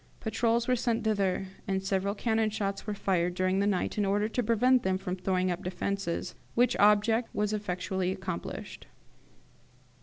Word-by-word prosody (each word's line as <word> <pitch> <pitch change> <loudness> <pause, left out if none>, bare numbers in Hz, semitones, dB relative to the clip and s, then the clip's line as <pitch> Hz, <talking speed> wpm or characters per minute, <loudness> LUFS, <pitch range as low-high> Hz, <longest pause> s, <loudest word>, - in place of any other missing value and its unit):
Patrols 230 +1 +1
were 255 - +3
sent 235 -2 0
thither, 200 -3 +1 0.2
and 190 -1 -1
several 195 +1 0
cannon 220 0 +1
shots 200 -1 -3
were 210 - -1
fired 180 -3 0
during 185 +1 +1
the 200 - +2
night, 205 +1 0
in - - +3
order 205 +2 +1
to 235 +3 -1
prevent 245 +3 +3
them 190 -2 0
from 185 -1 -4
throwing 185 0 0
up 175 - -4
defences, 180 0 -3 0.2
which 245 +1 +3
object 210 +3 +4
was 210 0 0
effectually 190 -2 -2
accomplished. 190 -2 -6
200 Hz, 160 wpm, -29 LUFS, 185-220 Hz, 0.2 s, object